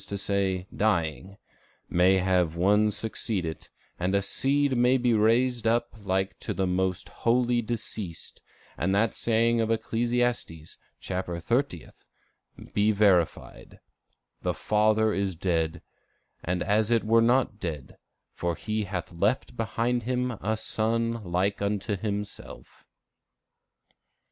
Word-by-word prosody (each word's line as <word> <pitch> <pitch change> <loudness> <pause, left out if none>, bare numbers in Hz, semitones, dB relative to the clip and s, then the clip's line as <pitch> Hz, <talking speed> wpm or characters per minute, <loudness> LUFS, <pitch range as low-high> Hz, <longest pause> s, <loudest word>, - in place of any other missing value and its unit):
e._, 100 -2 -1
dying] 95 -2 0 0.5
may 90 +2 +4
have 90 -3 +1
one 105 +5 +3
succeed 105 -3 -3
it, 80 -1 -6 0.3
and 90 +3 0
a 100 - +3
seed 140 +6 +1
may 125 +2 +4
be 120 -1 +2
raised 115 +2 +2
up 120 +1 +1
like 95 0 -1
to - - -4
the 95 - 0
most 90 0 -1
holy 120 0 +1
deceased, 110 -6 -6 0.4
and 95 +4 +1
that 110 +2 +2
saying 115 0 +2
of 110 - 0
Ecclesiastes, 115 -7 -1 0.2
chapter 90 -2 -4
thirtieth, 115 - -2 0.7
be 105 +1 +3
verified: 100 -5 +1 0.6
'The - - -1
father 110 0 +2
is 100 -2 -1
dead, 80 -2 -1 0.6
and 90 +1 -1
as 105 +2 +1
it 115 -1 +2
were 115 +1 +4
not 120 -2 +2
dead, 75 -8 -5 0.4
for 85 -1 -2
he 110 +2 -3
hath 90 -2 -5
left 100 +9 0
behind 115 +2 -1
him 125 +1 -1
a 110 +3 -1
son 115 +1 -1
like 95 +3 -1
unto 100 +1 -1
himself. 105 +1 -6
105 Hz, 125 wpm, -27 LUFS, 95-115 Hz, 0.7 s, may